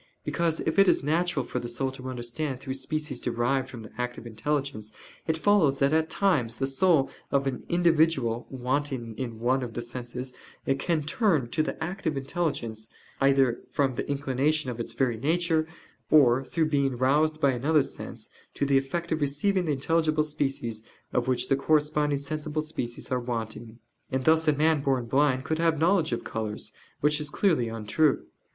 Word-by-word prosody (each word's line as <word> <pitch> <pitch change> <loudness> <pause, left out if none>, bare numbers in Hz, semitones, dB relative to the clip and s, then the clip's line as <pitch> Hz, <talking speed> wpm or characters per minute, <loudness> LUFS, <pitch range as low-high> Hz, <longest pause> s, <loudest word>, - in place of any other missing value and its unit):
Because 165 -2 0
if 160 - 0
it 195 - +7
is - - +3
natural 155 -2 +1
for - - -3
the 120 - -5
soul 130 +3 -2
to 130 -1 -7
understand 125 +3 -4
through 130 0 -4
species 135 0 -4
derived 130 +2 0
from 120 -3 -8
the 110 - -11
"active 125 -1 -3
intelligence," 120 -1 -3 0.4
it 160 -1 +1
follows 160 -7 +3
that 140 +2 +2
at 160 0 +2
times 150 - +1
the 135 - -1
soul 135 +1 +2 0.2
of 140 -1 +2
an 130 -3 -2
individual 160 -9 +2
wanting 130 -2 -2
in 115 -4 -4
one 130 +3 +2
of 120 -3 -6
the 120 - -2
senses 125 +1 -6 0.5
can 165 -3 0
turn 155 - +1
to 155 - +1
the 160 - -3
active 170 -3 -2
intelligence, 135 -7 -3 0.3
either 135 -3 +3
from 135 -2 +1
the 120 - -4
inclination 140 0 0
of 120 - -7
its 115 - -4
very 125 -4 0
nature, 160 +4 +1 0.4
or 135 -4 +5
through 160 +3 0
being 140 -4 +1
roused 150 +5 +2
by 140 -3 +4
another 145 +4 +2
sense, - - -8 0.2
to - - 0
the 135 -1 +4
effect 170 +6 -4
of 160 -1 0
receiving 175 +7 +1
the 155 - 0
intelligible 155 +2 +1
species 135 -7 -3 0.3
of 125 - +1
which 130 -1 0
the 135 - +3
corresponding 150 0 +2
sensible 155 +2 -3
species 125 -5 -6
are 125 - +2
wanting. 115 -1 -5 0.3
And 130 0 -1
thus 160 0 +4
a 150 - +5
man 155 +1 +2
born 135 -3 +1
blind 130 +1 +2
could 160 0 -1
have 165 -1 +2
knowledge 165 0 +2
of 120 - -2
colors; 110 -1 -4 0.3
which 150 +1 +2
is 150 - -1
clearly 150 - +1
untrue. 115 +7 +1
140 Hz, 180 wpm, -27 LUFS, 125-155 Hz, 0.5 s, it